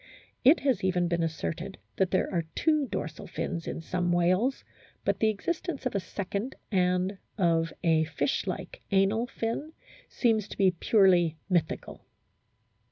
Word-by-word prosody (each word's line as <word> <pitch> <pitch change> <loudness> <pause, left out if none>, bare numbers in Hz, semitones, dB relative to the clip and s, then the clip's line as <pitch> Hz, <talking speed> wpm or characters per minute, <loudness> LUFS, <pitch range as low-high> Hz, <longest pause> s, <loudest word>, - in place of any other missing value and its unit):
It 280 +6 +6
has 265 -9 +1
even 180 -2 +2
been 170 0 0
asserted 155 - -3 0.2
that 190 -2 +2
there 185 - +1
are 170 -2 0
two 305 -3 +2
dorsal 155 -8 -5
fins 165 -1 -4
in - - -4
some 175 +1 -1
whales; 185 +9 +2 0.4
but - - +1
the 220 - +4
existence 310 - -3
of 255 - 0
a 200 - +1
second 200 +6 -4 0.2
and 185 0 +1 0.2
of 165 -4 +2
a 160 -2 +3
fish 145 +3 -1
like 185 -1 -5
anal 200 +5 +2
fin 235 +7 -3 0.4
seems 220 -4 +1
to - - -9
be 190 -2 +5
purely 180 -3 +3
mythical. 175 -3 -1
185 Hz, 150 wpm, -28 LUFS, 170-220 Hz, 0.4 s, It